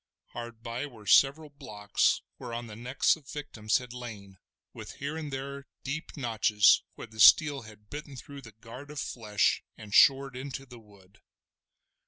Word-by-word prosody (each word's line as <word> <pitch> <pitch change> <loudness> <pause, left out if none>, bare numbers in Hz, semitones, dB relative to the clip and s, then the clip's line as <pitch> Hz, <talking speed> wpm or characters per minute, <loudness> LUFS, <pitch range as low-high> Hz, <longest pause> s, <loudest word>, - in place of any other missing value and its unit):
Hard 120 -1 -9
by 120 +5 -4
were 115 -6 -15
several 140 - +4
blocks 105 -7 0 0.2
whereon 120 -1 -5
the 110 -2 -10
necks 125 +4 +1
of 155 -4 -19
the - - -11
victims 110 -7 -1
had 125 -2 -8
lain, 105 -6 -9 0.3
with - - -9
here 140 +3 -5
and 155 -3 -5
there 140 +1 -6 0.2
deep 155 +4 -5
notches 110 -5 +4
where - - -8
the 110 -1 -15
steel 145 +3 +7
had 105 -2 -16
bitten 145 -1 -7
through 140 +2 -10
the 115 -4 -13
guard 115 +6 -11
of 150 -1 -6
flesh 105 -6 0 0.2
and 105 -1 -11
shored 135 +1 +5
into 135 +1 -6
the 125 -2 -13
wood. 100 -2 -21
120 Hz, 170 wpm, -29 LUFS, 110-140 Hz, 0.3 s, steel